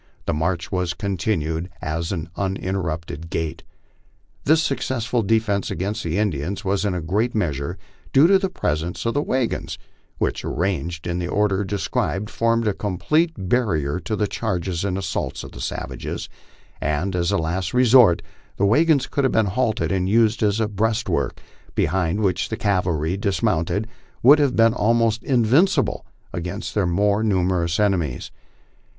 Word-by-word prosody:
The -, -, 0 dB
march 85 Hz, +3 st, -1 dB
was 90 Hz, -2 st, -1 dB
continued 85 Hz, -3 st, -2 dB
at 80 Hz, +2 st, -3 dB
an 85 Hz, -4 st, -3 dB
uninterrupted 85 Hz, -5 st, -3 dB
gait. 80 Hz, 0 st, -3 dB, 0.8 s
This 155 Hz, +3 st, +4 dB
successful 125 Hz, -4 st, -1 dB
defence 110 Hz, -1 st, +1 dB
against 100 Hz, +4 st, -3 dB
the 85 Hz, +2 st, -1 dB
Indians 100 Hz, 0 st, -1 dB
was 100 Hz, +2 st, 0 dB
in 95 Hz, -3 st, 0 dB
a 90 Hz, -, -3 dB
great 105 Hz, +9 st, 0 dB
measure 70 Hz, -9 st, -1 dB, 0.3 s
due 135 Hz, +4 st, +6 dB
to 195 Hz, +2 st, +6 dB
the 190 Hz, -1 st, -1 dB
presence 85 Hz, -, -2 dB
of 115 Hz, -, +1 dB
the 145 Hz, -, +1 dB
wagons, 130 Hz, -5 st, -1 dB, 0.4 s
which, -, -, -1 dB
arranged 85 Hz, -2 st, -2 dB
in 85 Hz, 0 st, -2 dB
the 85 Hz, -, -2 dB
order 100 Hz, +1 st, +1 dB
described, 100 Hz, +1 st, -2 dB
formed 115 Hz, 0 st, +1 dB
a 105 Hz, -, +2 dB
complete 150 Hz, -, +1 dB
barrier 90 Hz, -, 0 dB
to 110 Hz, -, -3 dB
the 105 Hz, -, +1 dB
charges 95 Hz, -5 st, -2 dB
and 95 Hz, -2 st, -1 dB
assaults 95 Hz, -, -3 dB
of -, -, -9 dB
the -, -, -9 dB
savages; -, -, -4 dB, 0.5 s
and, 75 Hz, +6 st, -1 dB
as 85 Hz, -1 st, +1 dB
a -, -, +2 dB
last 80 Hz, +2 st, -2 dB
resort, 125 Hz, -7 st, +5 dB, 0.3 s
the 100 Hz, -, +2 dB
wagons 145 Hz, +5 st, +4 dB
could 140 Hz, -, -1 dB
have 130 Hz, -, +2 dB
been 110 Hz, -, +3 dB
halted 110 Hz, +3 st, 0 dB
and 95 Hz, -1 st, 0 dB
used 110 Hz, 0 st, +3 dB
as 105 Hz, 0 st, +2 dB
a 110 Hz, -, +1 dB
breastwork, 110 Hz, +2 st, -1 dB, 0.4 s
behind 90 Hz, +3 st, +1 dB
which 95 Hz, -5 st, 0 dB
the -, -, -3 dB
cavalry, 90 Hz, -3 st, 0 dB
dis 100 Hz, +1 st, -1 dB
mounted, 95 Hz, 0 st, +1 dB, 0.4 s
would 145 Hz, +5 st, +8 dB
have 140 Hz, -3 st, +2 dB
been 115 Hz, 0 st, +5 dB
almost 115 Hz, -1 st, +2 dB
invincible 135 Hz, -, +2 dB, 0.3 s
against 90 Hz, +4 st, -4 dB
their 100 Hz, -4 st, +1 dB
more 100 Hz, +4 st, +2 dB
numerous 90 Hz, -5 st, +1 dB
en 105 Hz, -1 st, +4 dB
emies. 80 Hz, -9 st, -3 dB
100 Hz, 160 wpm, -22 LUFS, 85-115 Hz, 0.8 s, would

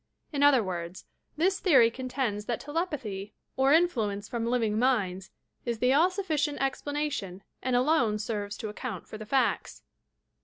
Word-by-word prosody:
In 285 Hz, -, -1 dB
other 285 Hz, -5 st, +6 dB
words, 175 Hz, -1 st, -5 dB, 0.3 s
this 375 Hz, +5 st, +2 dB
theory 260 Hz, -, +5 dB
contends 250 Hz, -4 st, -3 dB
that 235 Hz, 0 st, -2 dB
telepathy 270 Hz, -, -4 dB, 0.2 s
op 265 Hz, +1 st, +3 dB
influence 220 Hz, -12 st, +1 dB
from 235 Hz, -2 st, -3 dB
living 225 Hz, -3 st, +1 dB
minds 200 Hz, -7 st, +1 dB, 0.3 s
is 235 Hz, -2 st, -2 dB
the 250 Hz, +3 st, +3 dB
all 325 Hz, +6 st, +5 dB
sufBcient 315 Hz, -7 st, -1 dB
explana 290 Hz, +2 st, -1 dB
tion 190 Hz, -5 st, -5 dB, 0.2 s
and 255 Hz, -1 st, 0 dB
alone 245 Hz, -5 st, +3 dB
serves 205 Hz, -1 st, -4 dB
to 215 Hz, -, -5 dB
account 210 Hz, -3 st, -6 dB
for 215 Hz, -, -8 dB
the 215 Hz, -, -8 dB
facta. 265 Hz, +3 st, 0 dB
245 Hz, 155 wpm, -28 LUFS, 210-285 Hz, 0.3 s, other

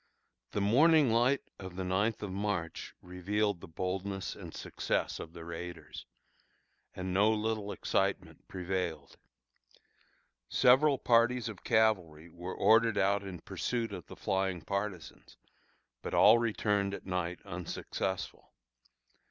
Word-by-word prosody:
The 105 Hz, -, 0 dB
morning 145 Hz, +6 st, +5 dB
light 120 Hz, +5 st, +3 dB, 0.2 s
of 95 Hz, -2 st, -8 dB
the 95 Hz, -, -3 dB
ninth 100 Hz, +4 st, 0 dB
of 100 Hz, -, -4 dB
March 95 Hz, -4 st, -3 dB
revealed 95 Hz, +2 st, -1 dB
the -, -, -9 dB
boldness 95 Hz, +3 st, -3 dB
and -, -, -9 dB
success -, -, -2 dB
of 80 Hz, -, -8 dB
the 85 Hz, -1 st, -9 dB
raiders, 85 Hz, +1 st, -8 dB, 0.9 s
and 90 Hz, 0 st, -4 dB
no 105 Hz, +3 st, +4 dB
little 110 Hz, -1 st, -1 dB
excitement 100 Hz, -, -2 dB
prevailed. 90 Hz, -6 st, -4 dB, 1.3 s
Several 135 Hz, +3 st, +5 dB
parties 120 Hz, 0 st, +3 dB
of 105 Hz, -, -10 dB
cavalry 95 Hz, -9 st, +1 dB
were 90 Hz, +3 st, -7 dB
ordered 115 Hz, -1 st, +4 dB
out 100 Hz, +1 st, +2 dB
in 95 Hz, -4 st, -8 dB
pursuit 120 Hz, -2 st, -3 dB
of -, -, -8 dB
the -, -, -10 dB
flying 95 Hz, -2 st, -1 dB
partisans, 100 Hz, -3 st, -5 dB, 0.6 s
but -, -, -4 dB
all 115 Hz, +2 st, +7 dB
returned 105 Hz, -3 st, 0 dB
at -, -, -11 dB
night 90 Hz, -1 st, -2 dB
unsuccessful. 90 Hz, +1 st, -4 dB
100 Hz, 125 wpm, -32 LUFS, 90-110 Hz, 1.3 s, all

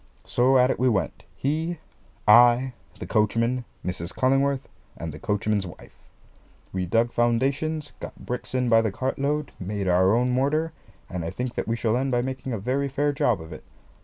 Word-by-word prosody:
So 130 Hz, +2 st, +3 dB
at 125 Hz, +1 st, +5 dB
it -, -, -3 dB
we 130 Hz, 0 st, +4 dB
went, 95 Hz, -9 st, -1 dB
he, 160 Hz, +5 st, -1 dB, 0.5 s
I, 120 Hz, +3 st, +6 dB, 0.2 s
the -, -, -6 dB
coachman, 115 Hz, +3 st, +1 dB, 0.2 s
Mrs. 90 Hz, -1 st, -3 dB
Cullingworth, 135 Hz, +1 st, +1 dB, 0.3 s
and 80 Hz, -2 st, -5 dB
the 75 Hz, -, -9 dB
coachman's 105 Hz, -2 st, 0 dB
wife. 85 Hz, -, -13 dB, 0.8 s
We 90 Hz, -1 st, -2 dB
dug 115 Hz, +5 st, +2 dB
foundations, 140 Hz, +7 st, 0 dB
got -, -, -7 dB
bricks 125 Hz, +1 st, -4 dB
in 125 Hz, -1 st, +1 dB
by 115 Hz, -1 st, +5 dB
the 110 Hz, -2 st, -1 dB
cartload, 140 Hz, +6 st, -1 dB
made 100 Hz, +1 st, -3 dB
our 95 Hz, +3 st, +4 dB
own 125 Hz, +1 st, +2 dB
mortar, 150 Hz, +6 st, +1 dB, 0.3 s
and 90 Hz, -2 st, -4 dB
I 80 Hz, -, -3 dB
think 125 Hz, +6 st, -4 dB
that -, -, -3 dB
we 115 Hz, -, 0 dB
shall 115 Hz, -1 st, 0 dB
end 135 Hz, +2 st, 0 dB
by 120 Hz, -1 st, +1 dB
making 130 Hz, 0 st, -4 dB
a 115 Hz, -, -1 dB
very 130 Hz, +7 st, -1 dB
fair 145 Hz, +2 st, 0 dB
job 120 Hz, -7 st, +1 dB
of 80 Hz, 0 st, -9 dB
it. -, -, -10 dB
120 Hz, 185 wpm, -25 LUFS, 105-135 Hz, 0.8 s, I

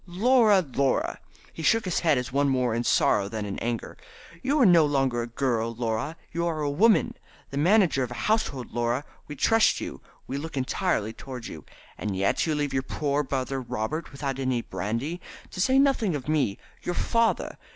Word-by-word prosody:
"Laura! 215 Hz, +2 st, +4 dB
Laura!" 135 Hz, -1 st, +1 dB, 0.3 s
He -, -, -7 dB
shook 225 Hz, +8 st, +3 dB
his 185 Hz, -, 0 dB
head 155 Hz, -5 st, +3 dB
as 125 Hz, 0 st, -4 dB
one 140 Hz, 0 st, +2 dB
more 125 Hz, -3 st, +1 dB
in 120 Hz, +1 st, -1 dB
sorrow 100 Hz, -4 st, +2 dB
than 110 Hz, -1 st, -4 dB
in 100 Hz, -1 st, -4 dB
anger. 120 Hz, -1 st, -3 dB, 0.5 s
"You 285 Hz, +3 st, +1 dB
are 255 Hz, -, +6 dB
no 175 Hz, -4 st, +7 dB
longer 135 Hz, -5 st, +1 dB
a 120 Hz, -, -4 dB
girl, 115 Hz, -2 st, -1 dB
Laura; 120 Hz, +7 st, -2 dB
you 170 Hz, +1 st, -1 dB
are 160 Hz, -2 st, -2 dB
a 145 Hz, -1 st, 0 dB
woman, 225 Hz, +8 st, +3 dB, 0.4 s
the 140 Hz, -, -2 dB
manager 175 Hz, -4 st, +4 dB
of 125 Hz, -, -1 dB
a -, -, -6 dB
household, 180 Hz, -, 0 dB
Laura. 120 Hz, +4 st, -1 dB, 0.2 s
We 150 Hz, -, -7 dB
trust 225 Hz, -, +3 dB
in -, -, -4 dB
you. -, -, -8 dB, 0.2 s
We 140 Hz, -, -4 dB
look 160 Hz, -1 st, -6 dB
entirely 130 Hz, -, -1 dB
towards 125 Hz, -3 st, -8 dB
you. 80 Hz, -, -10 dB, 0.3 s
And 100 Hz, -3 st, -3 dB
yet 100 Hz, -, +1 dB
you 155 Hz, -, +1 dB
leave 145 Hz, -2 st, -1 dB
your 130 Hz, -, +1 dB
poor 145 Hz, +2 st, -1 dB
brother 135 Hz, -1 st, -2 dB
Robert 130 Hz, +7 st, -4 dB
without 135 Hz, -1 st, -4 dB
any 130 Hz, -3 st, 0 dB
brandy, 115 Hz, -, -3 dB, 0.3 s
to 185 Hz, -, -4 dB
say 260 Hz, +6 st, +3 dB
nothing 265 Hz, -, +3 dB
of 140 Hz, -2 st, -6 dB
me, 150 Hz, -10 st, +1 dB, 0.2 s
your 175 Hz, -, -3 dB
father. 230 Hz, +4 st, 0 dB
140 Hz, 195 wpm, -26 LUFS, 120-175 Hz, 0.5 s, no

